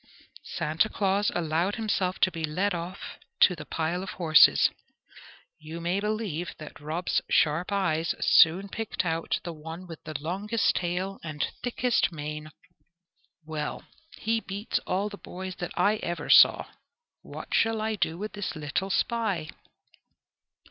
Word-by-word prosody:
Santa 160 +8 +1
Claus 200 0 +1
allowed 170 +3 0
himself 200 -5 -1
to 185 - +3
be 165 -2 -5
led 180 +6 0
off 175 +2 -6 0.2
to 180 - +6
the 150 -2 -9
pile 165 +2 -1
of 190 - -6
horses. 160 -4 +6 0.9
You 155 +2 -8
may 175 +3 0
believe 200 -7 -3
that 155 - -10
Rob's 160 +4 -1
sharp 160 +5 +2
eyes 170 -5 0
soon 180 +5 +5
picked 200 -4 -3
out 165 -1 -1
the 170 0 -5
one 160 +3 -8
with 165 -3 -10
the 155 -2 -5
longest 200 +8 0
tail 180 +2 -2
and 155 -3 -2 0.2
thickest 245 -2 +1
mane. 150 -1 -6 1.0
"Well, 155 -1 -4 0.3
he 225 +1 0
beats 200 0 -3
all 195 +3 0
the 205 -1 -9
boys 185 0 -7
that 175 - -4
I 210 +2 +3
ever 175 -4 -3
saw! - - +7 0.6
What - - -9
shall 225 -1 +2
I 220 +1 -1
do 170 -5 -1
with 210 +3 -5
the 205 - -6
little 155 +5 -2
spy?" 200 -7 0
180 Hz, 145 wpm, -27 LUFS, 160-200 Hz, 1.0 s, saw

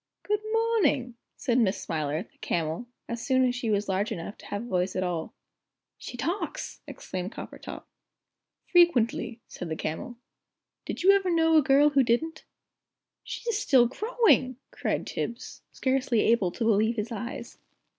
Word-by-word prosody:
"Good 420 0 0
morning!" 435 - +2 0.2
said 250 -2 +1
Miss 205 -5 +2
Smiler, 155 0 -2
the - - -29
camel, 165 +7 -2 0.2
as 235 0 -4
soon 260 -1 +3
as 245 - 0
she 240 -2 -2
was 205 -1 +1
large 195 +2 0
enough 170 +4 -5
to - - -12
have 205 +2 -3
a - - -8
voice 185 -2 0
at 185 - 0
all. 175 -3 -3 0.6
"She 245 - -8
talks!" 355 - -3
exclaimed 185 +3 -6
Coppertop. - - -8 0.8
"Frequently," 240 -9 +3
said 175 - -7
the 160 - -2
Camel; 160 +11 -4 0.7
"did - - -4
you 390 - +8
ever 395 -2 +3
know 325 -1 +3
a 310 - +7
girl 285 +2 +5
who 280 -1 +4
didn't?" 260 +7 0 0.8
"She's 465 -3 -3
still 260 - +5
growing!" 410 - +2 0.2
cried - - -2
Tibbs, 235 +1 -5
scarcely 260 -4 +1
able 225 -6 +3
to 230 - -3
believe 220 +1 +3
his 220 +1 -3
eyes. 235 +2 -6
240 Hz, 155 wpm, -27 LUFS, 205-310 Hz, 0.8 s, you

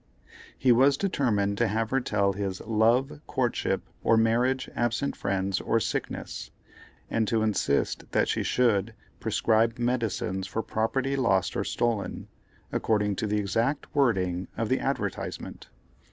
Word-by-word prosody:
He 130 - +3
was 135 +4 +5
determined 105 - 0
to - - +3
have 110 +2 -1
her 135 0 +2
tell 100 -4 +1
his 95 -1 -3
"love, 115 +6 +2
courtship, 125 -2 0 0.2
or 115 - +4
marriage, 120 +4 +2
absent 120 +4 0
friends, 95 -1 -1
or 115 - +1
sickness," - - -4 0.6
and 110 -1 +1
to 110 0 +1
insist 100 -10 0
that - - +2
she - - 0
should 115 -3 +1 0.2
"prescribe 115 +1 +2
medicines 115 -6 -1
for 110 +5 -3
property 130 +6 -1
lost 115 -9 +1
or - - 0
stolen," 115 -5 -2 0.4
according 105 -2 +1
to 110 - -1
the 105 +1 0
exact 115 +8 -1
wording 95 - +1
of - - -1
the - - +2
advertisement. - - -4
115 Hz, 140 wpm, -27 LUFS, 100-125 Hz, 0.6 s, was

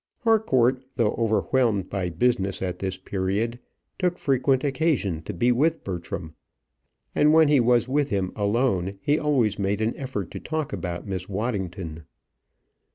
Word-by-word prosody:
Harcourt, 130 - +3
though 115 -4 +2
overwhelmed 110 -2 +1
by 95 -3 -1
business 95 +1 0
at 90 -1 -3
this 95 -1 -3
period, 100 +5 -2 0.4
took 180 -1 +1
frequent 130 -1 +1
occasion 135 - 0
to 95 - -6
be 120 +6 +2
with 155 +7 +1
Bertram; 85 -3 -5 0.8
and 150 +1 +4
when 160 -2 +6
he 145 -2 +5
was 120 0 +3
with 145 +2 +1
him 95 -2 -1
alone 100 -3 0
he 145 +9 +1
always 130 -10 +1
made 100 +1 0
an 110 +1 0
effort 125 - -5
to - - -6
talk 155 -2 -3
about 85 -2 -4
Miss 95 -2 -4
Waddington. 95 -7 -4
115 Hz, 150 wpm, -25 LUFS, 95-135 Hz, 0.8 s, when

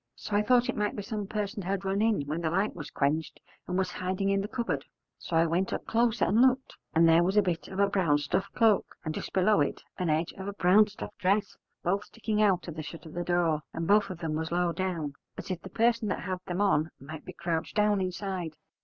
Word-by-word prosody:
So 205 - -4
I 205 - +4
thought 245 +3 +3
it - - -1
might 210 -1 -1
be 205 - -4
some 210 -2 -4
person 205 -1 -3
had 195 +1 -2
run 195 +2 0
in 220 -6 +2
when 155 +4 -3
the 160 - 0
light 195 +5 0
was 155 -4 -7
quenched, 150 +3 -1 0.3
and 180 - -1
was 190 -2 0
hiding 185 +2 -1
in 195 0 +2
the 200 - -3
cupboard. 190 - -2 0.4
So 170 - -4
I 165 - +5
went 175 +4 0
up - - -3
closer 235 0 +2
and 220 +4 +3
looked: 260 0 +3 0.2
and 165 +1 +6
there 165 +1 +6
was 190 +4 +1
a 210 - +6
bit 175 -2 -2
of 190 - -8
a 200 - +5
black 170 -8 +2
stuff 145 +7 -1
cloak, 225 -4 +3
and 155 - -2
just - - -5
below 195 +3 +3
it - - -1 0.2
an 180 -2 0
edge 155 +2 +1
of 190 - -5
a 200 - -3
brown 200 +2 +5
stuff 210 0 -8
dress, 200 +1 +1 0.3
both 195 +4 0
sticking 215 -2 -2
out 195 -4 +3
of 165 -2 -7
the - - -2
shut 155 +3 -9
of 160 - -10
the 175 - -2
door: 170 -3 +1
and 165 - -2
both 205 +4 +4
of 185 - -5
them 165 -2 -3
was 160 +1 -2
low 175 0 +1
down, 170 -5 -2 0.2
as - - -6
if 180 - -3
the 190 - -9
person 230 0 +2
that 195 - -2
had 185 -1 -3
them 180 +2 -1
on 165 -6 +3
might 150 +3 -9
be - - -8
crouched 170 -2 -3
down 210 -2 +3
inside. 185 -3 -3
185 Hz, 250 wpm, -29 LUFS, 165-205 Hz, 0.4 s, and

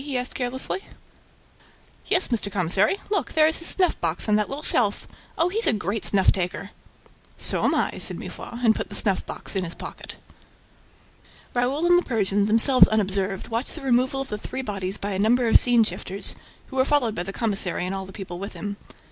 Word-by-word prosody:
he 280 -3 -3
asked 250 0 -2
carelessly. 260 +7 -2 1.3
"'Yes, 370 - +1
Mr. 220 -4 -1
Commissary... 190 - +2
Look, 400 - -1
there 310 -1 +4
is 320 +1 +3
his 335 - +1
snuff 365 -3 +3
box 165 +4 0
on 210 - +3
that 210 0 +1
little 285 +3 -6
shelf... 210 -4 0 0.3
Oh! 335 +2 +2
he's 445 +5 +3
a - - +4
great 210 0 -3
snuff 195 -2 +4
taker!" 185 +1 -4 0.7
"So - - 0
am - - +2
I," - - -1
said - - -2
Mifroid 240 +1 -7
and 220 - +5
put - - -5
the - - -5
snuff 195 -4 +3
box - - -5
in 190 - 0
his 170 -1 -4
pocket. - - -8 1.4
Raoul 255 +6 0
and 350 0 +5
the - - -4
Persian, 205 -4 0
themselves 230 +4 +6
unobserved, 195 -2 -1
watched 230 +3 -3
the 315 - -9
removal 260 +1 +1
of 270 - -7
the 210 - -4
three 265 +5 -6
bodies 195 -3 -4
by 205 - -4
a 190 - -2
number 235 +4 +2
of 225 - +7
scene 240 -2 +4
shifters, 195 0 -2 0.4
who 265 - -8
were 260 - +4
followed 270 -6 +1
by 175 - -3
the 185 +2 -5
commissary 195 -5 -1
and 185 - -3
all 190 -1 -5
the - - -10
people 180 -3 -8
with 200 +2 -6
him. 205 -1 -6
220 Hz, 205 wpm, -24 LUFS, 195-260 Hz, 1.4 s, of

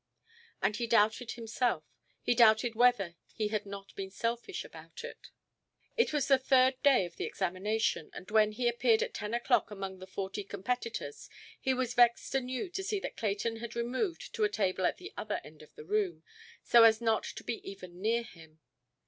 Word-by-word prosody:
And 210 - +2
he 235 - -2
doubted 220 +2 +2
himself; 230 -6 -1 0.4
he - - +3
doubted 230 0 +5
whether 225 -8 +3 0.2
he 215 -2 -1
had 210 -1 -2
not 200 0 -8
been 195 -1 -5
selfish 235 - -3
about 470 - -11
it. 485 - -9 0.7
It 465 - +2
was 295 -2 0
the 270 -2 +5
third 260 0 +3
day 270 -9 +5
of 175 - -11
the - - -2
examination, 200 -1 -1
and 185 - -10
when 215 -1 +4
he 245 +2 0
appeared 240 -1 +3
at - - -5
ten 210 +1 -4
oʼclock 240 -3 +2
among 195 -2 -6
the 185 - -10
forty 195 +1 -4
competitors, 200 - -4 0.3
he 260 -1 +1
was 250 -1 -1
vexed 240 -1 +4
anew 260 +4 -1
to 385 +2 -3
see 410 +1 -1
that - - -6
Clayton 220 +2 -1
had 235 0 -7
removed 255 - -2
to 220 - 0
a 210 - +4
table 190 -3 0
at - - -2
the 375 +3 -10
other 210 -1 -2
end 155 0 -14
of 155 - -17
the 150 - -10
room, 185 -4 -1 0.4
so 235 - +6
as 220 -1 +6
not 225 -2 +1
to - - -7
be 230 - -4
even 185 -2 -10
near 230 +3 +1
him. 160 -6 -15
220 Hz, 190 wpm, -31 LUFS, 195-245 Hz, 0.7 s, so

